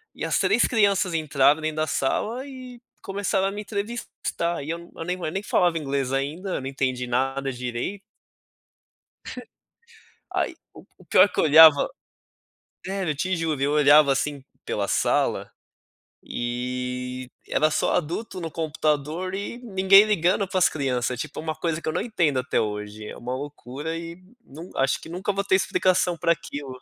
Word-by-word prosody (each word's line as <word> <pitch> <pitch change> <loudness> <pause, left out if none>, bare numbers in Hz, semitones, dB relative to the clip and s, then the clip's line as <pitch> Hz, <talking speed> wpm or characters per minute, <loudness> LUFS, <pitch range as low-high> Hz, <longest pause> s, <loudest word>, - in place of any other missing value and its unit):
e - - -4
as - - +1
3 245 - +3
crianças 200 -5 +2
entraram 150 -1 +3
dentro 155 0 -3
da 155 - +1
sala 225 - -1
e 255 -2 -10 0.2
começaram 195 0 -1
a - - -2
me 205 +1 -5
entrevistar 200 -6 -3
e 145 - -7
eu 170 - -4 0.3
nem 180 +1 -2
nem 195 +3 -3
falava 175 -4 +2
inglês 140 -3 -2
ainda, 155 +8 -2
eu - - -3
não 135 - -5
entendi 130 -2 -2
nada 135 +2 -1
direito. 125 +10 -4 2.3
Aí, - - -1 0.2
o - - -12
o - - -22
o - - -17
pior - - +6
que - - -4
eu - - +4
olhava 155 -1 +8 1.0
sério, 190 -4 -2
eu - - -4
te 185 +5 -1
juro, 155 -4 -2
eu 140 - +2
olhava 145 -1 +6
assim 140 0 -1 0.2
pela - - -2
sala, - - +1 0.7
e 125 +1 -4 0.2
era 155 0 +2
só - - +1
adulto 180 +3 -2
no 165 - -5
computador 155 +2 -1
e 200 +4 -4
ninguém 195 -4 +6
ligando 195 -1 +1
para 190 - -2
as 180 - +6
criança, 125 -4 -1
tipo, 145 +4 -6
uma 155 -1 -3
coisa 165 -1 -2
que - - -8
eu 155 - 0
não - - 0
entendo 165 - +1
até 135 +2 0
hoje, 105 0 -4
é - - -8
uma 125 +1 -5
loucura 145 +2 -6
e 170 +1 -8 0.2
num 160 +6 -11
acho 135 0 +1
que - - -12
nunca 185 +4 -2
vou 200 0 -2
ter 190 - +3
explicação 185 -2 +1
pra 170 - +3
aquilo. 140 -5 -8
155 Hz, 170 wpm, -24 LUFS, 135-190 Hz, 2.3 s, olhava